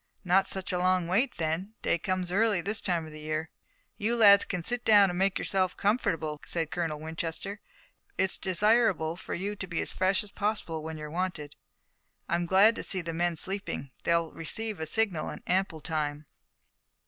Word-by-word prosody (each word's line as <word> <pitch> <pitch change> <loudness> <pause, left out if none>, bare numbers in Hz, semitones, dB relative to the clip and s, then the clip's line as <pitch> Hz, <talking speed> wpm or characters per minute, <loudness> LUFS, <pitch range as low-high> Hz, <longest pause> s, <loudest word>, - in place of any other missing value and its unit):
"Not 190 +1 +3
such 190 -1 -1
a 180 - 0
long 185 -1 +2
wait 230 +9 +1
then. 170 +6 -2
Day 170 - +1
comes 185 0 -2
early 210 0 +2
this 205 +6 -2
time 170 -4 -1
of 155 - -10
the 155 - -10
year." 155 +1 -3 0.5
"You 225 +3 +1
lads 200 -3 +7
can 180 -3 -3
sit 245 +5 0
down 205 -3 +6
and 175 - -4
make 195 0 +2
yourselves 185 -2 0
comfortable," 165 -8 0
said 165 -2 -3
Colonel 165 -4 -2
Winchester. 165 +6 -5 0.6
"It's 190 - +1
desirable 190 -3 +2
for 180 - -6
you 200 +4 -3
to 190 - -6
be 170 -2 -2
as - - -2
fresh 190 +2 +2
as 205 - -8
possible 205 -6 -2
when 160 0 -6
you're 150 -1 -7
wanted. 170 -4 -3 0.7
I'm 170 0 0
glad 195 +5 +6
to - - -4
see 185 - -1
the 165 -1 -5
men 175 +1 0
sleeping. 190 -6 -3
They'll 170 -1 +1
receive 210 +5 -4
a 160 - -3
signal 185 -4 0
in - - -8
ample 185 -4 0
time." 150 -2 -2
180 Hz, 185 wpm, -29 LUFS, 160-200 Hz, 0.7 s, lads